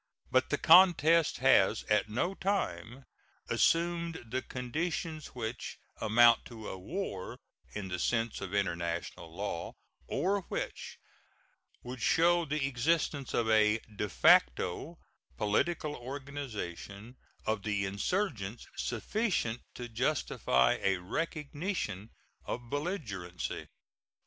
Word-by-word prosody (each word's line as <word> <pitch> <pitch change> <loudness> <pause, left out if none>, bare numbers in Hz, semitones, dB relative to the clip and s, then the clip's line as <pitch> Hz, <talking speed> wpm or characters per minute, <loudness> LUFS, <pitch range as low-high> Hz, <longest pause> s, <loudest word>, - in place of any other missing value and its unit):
But - - +3
the - - +1
contest 170 -3 +6
has - - +5
at 105 0 +1
no 125 - 0
time 130 - -2 0.5
assumed 170 -6 +1
the 130 +1 0
conditions 155 +5 -4
which 120 0 -5 0.2
amount 115 +1 +5
to 110 -3 -8
a - - -5
war 100 - -5 0.4
in 100 -3 -4
the 90 0 -3
sense 115 +3 0
of 95 - -5
international 85 -4 -2
law, 90 -1 -4 0.3
or 195 +7 0
which - - -4 0.9
would 125 0 -7
show 170 +1 +4
the 150 -1 -1
existence 140 +1 0
of 115 - +1
a 110 -1 +4 0.2
de 105 0 -2
facto 90 - +3 0.4
political 150 +9 0
organization 120 -6 -6 0.3
of 110 -1 0
the 105 -1 -1
insurgents 110 - -2
sufficient 125 - -1
to 120 - -6
justify 115 - +1
a 95 -1 +2
recognition 145 - -3 0.4
of 120 -1 -5
belligerency. 115 - -4
120 Hz, 105 wpm, -31 LUFS, 100-160 Hz, 0.9 s, contest